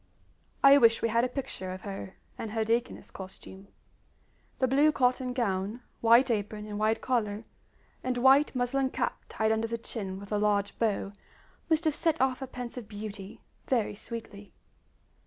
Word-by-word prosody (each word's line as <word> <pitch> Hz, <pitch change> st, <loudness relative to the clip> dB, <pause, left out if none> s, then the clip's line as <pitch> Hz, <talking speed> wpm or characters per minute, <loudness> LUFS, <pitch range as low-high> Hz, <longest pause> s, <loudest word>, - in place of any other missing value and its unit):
I 275 Hz, +1 st, +9 dB
wish 230 Hz, -2 st, +4 dB
we 230 Hz, -, +2 dB
had 230 Hz, +2 st, +2 dB
a -, -, +2 dB
picture 250 Hz, -8 st, -5 dB
of 185 Hz, 0 st, -7 dB
her 195 Hz, -1 st, -7 dB, 0.2 s
in 225 Hz, -, -4 dB
her 220 Hz, +1 st, 0 dB
deaconess 230 Hz, +2 st, -1 dB
costume. 190 Hz, 0 st, -10 dB, 0.9 s
The 260 Hz, -, +2 dB
blue 285 Hz, +4 st, +4 dB
cotton 255 Hz, -2 st, +1 dB
gown, 210 Hz, -1 st, -1 dB, 0.2 s
white 235 Hz, +3 st, +5 dB
apron 210 Hz, -1 st, -2 dB
and 210 Hz, -1 st, -5 dB
wide 215 Hz, +1 st, +1 dB
collar, 220 Hz, -4 st, -1 dB, 0.6 s
and 255 Hz, -1 st, -1 dB
white 265 Hz, +3 st, +5 dB
muslin 260 Hz, +2 st, +1 dB
cap -, -, -2 dB
tied 220 Hz, 0 st, 0 dB
under 220 Hz, +1 st, +1 dB
the 230 Hz, +1 st, -3 dB
chin 195 Hz, -4 st, -6 dB
with 200 Hz, +1 st, -11 dB
a 210 Hz, -, +1 dB
large 205 Hz, -1 st, +1 dB
bow, 205 Hz, -3 st, 0 dB, 0.6 s
must 320 Hz, 0 st, +2 dB
have 315 Hz, -2 st, +2 dB
set 325 Hz, +1 st, 0 dB
off 260 Hz, -1 st, +2 dB
her 265 Hz, -, -5 dB
pensive 245 Hz, -2 st, -7 dB
beauty 205 Hz, -2 st, -8 dB, 0.3 s
very 235 Hz, -6 st, +1 dB
sweetly. 210 Hz, -2 st, -8 dB
230 Hz, 165 wpm, -29 LUFS, 205-255 Hz, 0.9 s, I